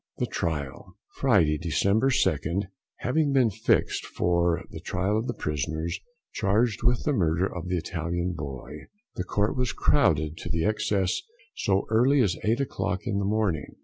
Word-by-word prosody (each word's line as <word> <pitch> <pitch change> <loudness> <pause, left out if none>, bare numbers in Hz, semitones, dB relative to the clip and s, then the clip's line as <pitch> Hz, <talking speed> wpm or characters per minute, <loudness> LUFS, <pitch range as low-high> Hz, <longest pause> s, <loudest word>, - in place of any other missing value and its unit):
THE - - 0
TRIAL. 75 +2 -4 0.2
Friday, 85 - +3
December 100 - +2
2nd, 90 - +1 0.4
having 145 +3 +1
been 125 -5 +4
fixed 110 +3 +1
for 85 -1 +1
the - - -7
trial 95 +3 -1
of 110 +3 -1
the - - -3
prisoners 80 +3 -2 0.3
charged 105 +1 +1
with 120 0 +2
the 150 - +1
murder 85 - +2
of 90 -2 -5
the 90 0 0
Italian 85 +1 -2
boy, 75 -1 -7 0.3
the 90 - -3
Court 105 +5 0
was 125 -1 0
crowded 75 0 +2
to 85 -2 -2
excess 105 -3 +1 0.3
so 95 -1 +1
early 130 +6 +4
as 100 -6 +2
eight 115 +4 +2
o'clock 130 -6 -2
in 100 -4 0
the 100 - -1
morning. 100 -8 -1
95 Hz, 155 wpm, -27 LUFS, 80-110 Hz, 0.4 s, been